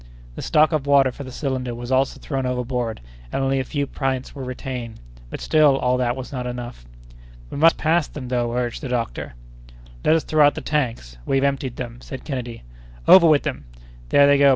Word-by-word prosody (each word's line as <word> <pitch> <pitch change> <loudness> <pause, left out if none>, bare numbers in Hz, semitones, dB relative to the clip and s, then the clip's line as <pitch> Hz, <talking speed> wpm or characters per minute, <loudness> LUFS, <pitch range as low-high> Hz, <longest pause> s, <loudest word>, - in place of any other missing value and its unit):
The - - -7
stock 155 +1 +3
of 150 -3 -1
water 140 -2 +5
for 140 - -9
the 130 - -9
cylinder 130 -2 -3
was 120 +1 -7
also 130 +1 +1
thrown 135 -3 -3
overboard 125 -2 -2 0.3
and 135 - -1
only 135 0 +1
a - - 0
few 145 +2 -2
pints 135 -1 -3
were 135 - -7
retained, 125 -3 -6 0.3
but - - -6
still 150 -3 +4
all 125 -1 +1
this 125 -1 0
was 130 -1 -7
not 125 -2 -4
enough. 120 - -7 0.7
"We - - -5
must 165 +3 +5
pass 160 0 +2
them 130 -4 -8
though!" 120 -2 0
urged 120 -1 -2
the 135 - -5
doctor. 115 - -3 0.7
"Let 160 - +4
us 165 - +1
throw 155 -1 +3
out 145 - +5
the - - -5
tanks—we 115 - -2
have 135 - +1
emptied 135 -3 -1
them." 120 -1 -7
said 130 - -8
Kennedy. 125 -5 -5 0.4
"Over 175 -3 +9
with 150 -3 +4
them!" 135 - -4 0.4
"There 140 - +6
they 140 0 +5
go!" 140 0 +7
130 Hz, 205 wpm, -22 LUFS, 125-140 Hz, 0.7 s, Over